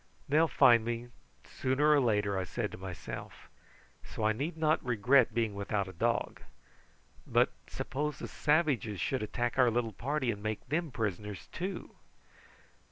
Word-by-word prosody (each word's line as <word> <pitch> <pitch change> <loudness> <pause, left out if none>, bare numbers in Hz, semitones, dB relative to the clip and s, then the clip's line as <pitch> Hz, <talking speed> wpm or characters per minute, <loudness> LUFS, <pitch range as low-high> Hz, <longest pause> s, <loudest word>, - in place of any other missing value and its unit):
"They'll 155 +4 +4
find 120 -6 +5
me 115 +1 -2
out - - -17 0.3
sooner 140 +4 +1
or 150 - +6
later," 105 -4 +1
I 95 - 0
said 90 - -3
to - - -8
myself; 90 -3 -8 0.5
"so 110 - -6
I 110 0 +3
need 150 +9 -3
not 155 0 +2
regret 125 +1 +4
being 115 -3 +1
without 100 0 -2
a 95 - -9
dog. 115 +7 -1 0.9
But - - +3 0.2
suppose 150 +2 -3
the - - -6
savages 145 - +1
should 130 - -1
attack 120 +2 -2
our 125 -2 +6
little 115 -1 -1
party 130 +4 -1
and 100 -2 -7
make 110 +2 -4
them 160 +4 -1
prisoners 105 -4 -4
too." 185 +3 -5
120 Hz, 160 wpm, -31 LUFS, 105-145 Hz, 0.9 s, or